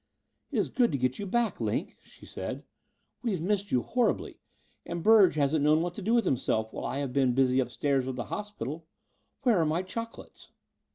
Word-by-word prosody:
"It - - -2
is - - +1
good 245 -6 +2
to - - +1
get 130 0 -1
you 205 - -4
back. 235 +3 0
Line," - - -1
she - - -17
said. - - -6 0.6
'*We 235 -4 -1
have 180 - -3
missed 200 +2 -1
you 125 - +2
horribly: 245 -1 0 0.4
and 170 -1 -5
Burge 210 -6 +6
hasn't 145 0 +2
known 155 +2 +4
what 175 0 -3
to 205 - -7
do 220 +5 +2
with 235 -3 +3
himself 110 -6 0
while - - -5
I - - -2
have 140 -3 -3
been 130 -3 +2
busy 130 -1 +3
upstairs 135 0 0
with 130 - -3
the 120 - -3
hospital. 165 - -5 0.6
Where 235 -8 +4
are - - +3
my 165 +4 0
chocolates?" 230 +5 -8
165 Hz, 205 wpm, -29 LUFS, 135-205 Hz, 0.6 s, Burge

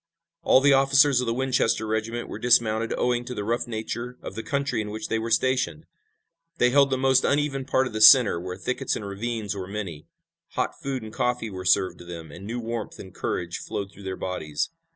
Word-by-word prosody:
All 130 - +5
the 140 0 +5
officers 135 0 +4
of 125 - -3
the 115 - +1
Winchester 130 -4 +1
regiment 110 +2 -2
were - - -7
dismounted 115 -2 +2
owing 120 -1 +1
to 125 0 -6
the 105 - -3
rough 120 +3 -1
nature 120 +2 -5
of - - -6
the 110 - -5
country 140 -3 -1
in 105 - -5
which 110 +1 -6
they 115 - 0
were 115 +1 -4
stationed. 120 -8 0 0.7
They 125 0 +3
held 140 +1 +5
the 130 - 0
most 130 0 +3
uneven 140 -2 0
part 130 -1 +2
of 125 - -6
the 110 - -2
center, 110 -7 +8
where 90 0 -6
thickets 125 +7 -2
and 105 - -5
ravines 105 +1 -3
were 95 -2 -6
many. 95 -7 -6 0.5
Hot - - -1
food 135 -3 -3
and 110 0 -9
coffee 125 -3 -1
were 95 -1 -7
served 95 0 +2
to 90 - -11
them, 85 -3 -8
and 95 +6 -10
new 120 +2 -3
warmth 115 -2 -5
and 95 -2 -11
courage 85 0 -3
flowed 100 -1 -5
through 100 - -15
their 95 -1 -3
bodies. 80 - -3
115 Hz, 215 wpm, -25 LUFS, 100-130 Hz, 0.7 s, center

